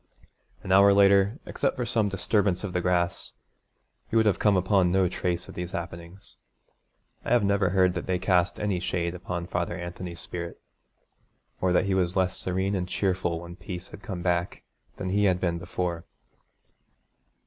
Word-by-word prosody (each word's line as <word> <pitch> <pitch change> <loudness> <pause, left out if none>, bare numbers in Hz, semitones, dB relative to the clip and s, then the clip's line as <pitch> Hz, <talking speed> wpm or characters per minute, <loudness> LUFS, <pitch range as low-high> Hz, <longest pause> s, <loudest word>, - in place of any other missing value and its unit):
An 95 - -4
hour 100 +1 +7
later, 100 +3 +5
except - - -1
for 125 - -2
some 110 -3 +1
disturbance 100 -1 0
of 95 -3 -4
the 90 - 0
grass, 90 -1 0 0.8
you 115 - +1
would 110 - +4
have 105 - +2
come 105 -2 +4
upon 95 -1 +3
no 95 0 +3
trace 90 -1 -2
of - - -10
these 90 -1 -5
happenings. 85 +2 -8 0.9
I - - -4
have 120 -2 +4
never 100 -2 +2
heard 90 -1 +3
that - - -5
they 95 -1 +1
cast 90 -1 +1
any 100 -4 0
shade 85 -1 -2
upon 90 -1 -4
Father 85 0 -2
Anthony's 85 -1 -7
spirit, 85 0 -6 1.0
or 95 - +2
that 90 - +3
he 100 - 0
was 90 -1 +1
less 95 0 +1
serene 95 +2 -1
and 90 -2 -1
cheerful 90 -4 -1
when 85 0 -9
peace 90 -1 -8
had - - -11
come 95 -6 -6
back 90 0 -1 0.3
than 95 - -3
he 100 +2 +2
had 90 -2 +3
been 85 -2 -1
before. 90 -1 -3
90 Hz, 175 wpm, -27 LUFS, 85-100 Hz, 1.0 s, hour